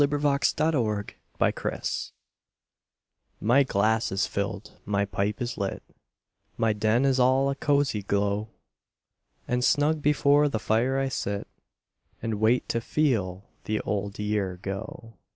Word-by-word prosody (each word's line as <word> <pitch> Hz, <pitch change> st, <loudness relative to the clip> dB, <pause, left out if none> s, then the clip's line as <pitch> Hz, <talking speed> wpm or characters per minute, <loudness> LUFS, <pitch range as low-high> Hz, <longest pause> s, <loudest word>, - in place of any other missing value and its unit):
The 145 Hz, -, +5 dB
Passing 145 Hz, +1 st, +1 dB
of 160 Hz, -, +3 dB, 0.7 s
the -, -, +2 dB
Year -, -, -2 dB, 1.6 s
My 120 Hz, +6 st, +4 dB
glass 110 Hz, -2 st, +1 dB
is 95 Hz, +2 st, +1 dB
filled, 100 Hz, 0 st, -4 dB
my 100 Hz, 0 st, 0 dB
pipe 100 Hz, +1 st, -2 dB
is 120 Hz, 0 st, -4 dB
lit, 100 Hz, -1 st, -3 dB, 0.7 s
My 110 Hz, -1 st, +2 dB
den 110 Hz, +5 st, +2 dB
is 135 Hz, -1 st, +2 dB
all 130 Hz, +2 st, +3 dB
a -, -, -3 dB
cosy 140 Hz, -6 st, +1 dB
glow; 100 Hz, +2 st, -1 dB, 1.0 s
And 125 Hz, 0 st, 0 dB
snug 150 Hz, +3 st, +2 dB
before 145 Hz, 0 st, +4 dB
the 115 Hz, -, -1 dB
fire 115 Hz, +5 st, +1 dB
I 135 Hz, 0 st, +1 dB
sit, 100 Hz, -5 st, -3 dB, 0.7 s
And 110 Hz, -2 st, -3 dB
wait 115 Hz, +3 st, +3 dB
to 115 Hz, -, 0 dB
FEEL 105 Hz, -10 st, 0 dB, 0.2 s
the 105 Hz, 0 st, -1 dB
old 100 Hz, -1 st, -3 dB
year 105 Hz, -3 st, -1 dB
go. 110 Hz, +2 st, -7 dB
110 Hz, 135 wpm, -27 LUFS, 100-135 Hz, 1.6 s, The